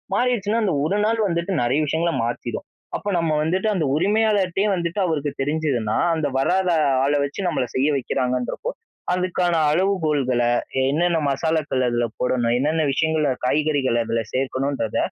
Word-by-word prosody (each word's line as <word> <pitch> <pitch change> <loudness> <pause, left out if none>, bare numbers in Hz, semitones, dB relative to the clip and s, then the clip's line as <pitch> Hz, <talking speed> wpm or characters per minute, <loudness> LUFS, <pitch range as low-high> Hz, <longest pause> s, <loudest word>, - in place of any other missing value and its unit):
மாறிடுச்சுனா 230 -2 +1
அந்த 195 -5 +1
ஒரு 195 +6 0
நாள் 225 +1 +1
வந்துட்டு 170 +1 -2
நிறைய 125 +5 +1
விஷயங்கள 165 +3 0
மாத்திடும். 120 - -4 0.3
அப்போ 205 - -5
நம்ம 165 -1 0
வந்துட்டு, 185 +6 0
அந்த 165 -5 0
உரிமையாளர்ட்டியே 200 +1 +2
வந்துட்டு 170 +2 -3
அவருக்கு 150 -4 -1
தெரிஞ்சதுன்னா, 135 -7 0 0.2
அந்த 160 -2 -1
வராத 185 +6 +1 0.4
ஆள 140 - +1
வச்சு 140 - -7
நம்மளை 145 -7 -1
செய்ய 130 +2 +2
வைக்கிறாங்கன்றப்போ, 125 - -2 0.4
அதுக்கான 180 -1 0 0.2
அளவுகோல்கள, 155 -8 +1 0.5
என்னென்ன 170 +4 +1
மசாலாக்கள 145 -2 0
அதில 120 0 0
போடணும், 120 -2 +1
என்னென்ன 155 +4 +1
விஷயங்கள 160 +1 +1 0.2
காய்கறிகள் 145 -4 +1
அதில 115 0 -1
சேர்க்கணுன்றத 135 -2 -1
155 Hz, 135 wpm, -22 LUFS, 135-180 Hz, 0.5 s, உரிமையாளர்ட்டியே